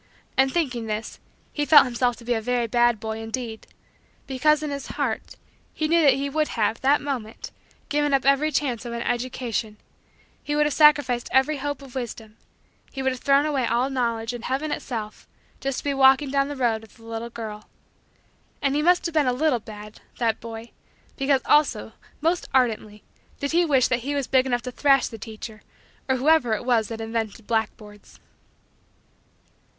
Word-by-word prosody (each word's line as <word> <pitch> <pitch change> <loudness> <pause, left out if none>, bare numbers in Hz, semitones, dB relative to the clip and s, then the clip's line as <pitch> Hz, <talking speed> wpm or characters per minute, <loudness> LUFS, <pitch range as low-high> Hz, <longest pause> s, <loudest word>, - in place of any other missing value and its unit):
And, 265 0 +3
thinking 255 -9 -1
this, 215 +1 -4 0.3
he 295 - -1
felt 290 -1 +7
himself 245 -1 0
to 235 - -15
be 245 - +1
a 225 - -1
very 245 +1 0
bad 240 0 +2
boy, 220 0 -4
indeed; 225 0 -5 0.6
because, 300 +3 +2
in 300 - -3
his 280 -1 -5
heart, - - -2 0.4
he 310 - 0
knew 335 +1 +4
that 280 -4 +5
he 275 +1 -2
would 305 +2 0
have, 220 0 0
that 280 +2 +3
moment, 245 -6 -5 0.4
given 295 0 +1
up 270 -1 +2
every 275 +3 +3
chance 260 -5 -1
of 240 -1 -6
an 235 0 -3
education; 240 -3 -3 0.6
he 295 - -3
would 300 0 +3
have 295 - 0
sacrificed 290 -5 +4
every 265 +3 +3
hope 285 +1 -4
of 265 -3 -13
wisdom; 225 -4 -6 0.6
he 270 - -5
would 265 - +2
have 255 - -6
thrown 280 +1 +4
away 275 -5 0
all 245 +4 +1
Knowledge 230 -3 -1
and 240 -1 -7
heaven 275 +4 -2
itself 220 -4 -5 0.3
just 270 -1 -2
to - - -5
be 285 - 0
walking 270 +1 +4
down 275 0 +2
the 290 - -5
road 235 -4 0
with 220 - -17
the 225 - -19
little 230 +1 -5
girl. 215 -2 -8 0.9
And 275 -1 0
he 300 - +2
must 355 +3 +3
have 335 - -2
been 305 -4 +2
a - - +3
little 255 -2 +1
had 210 0 -10 0.2
that 230 -2 0
boy 230 0 -8 0.4
because 270 -1 +2
also, 280 -8 +2 0.3
most 335 +3 0
ardently, 220 -4 0 0.4
did 280 - -2
he 345 +2 +3
wish 270 -5 +3
that 255 - +1
he 280 +4 -3
was 280 -2 -1
big 260 +1 +2
enough 245 -2 0
to 250 - -5
thrash 275 +1 +3
the 225 - -9
teacher 220 0 -9 0.5
or 260 - +3
whoever 265 -3 +3
it 230 - -6
was 235 -4 +2
that 225 -1 -6
invented 225 -1 -4
blackboards. 210 -2 -4
255 Hz, 190 wpm, -24 LUFS, 225-280 Hz, 0.9 s, felt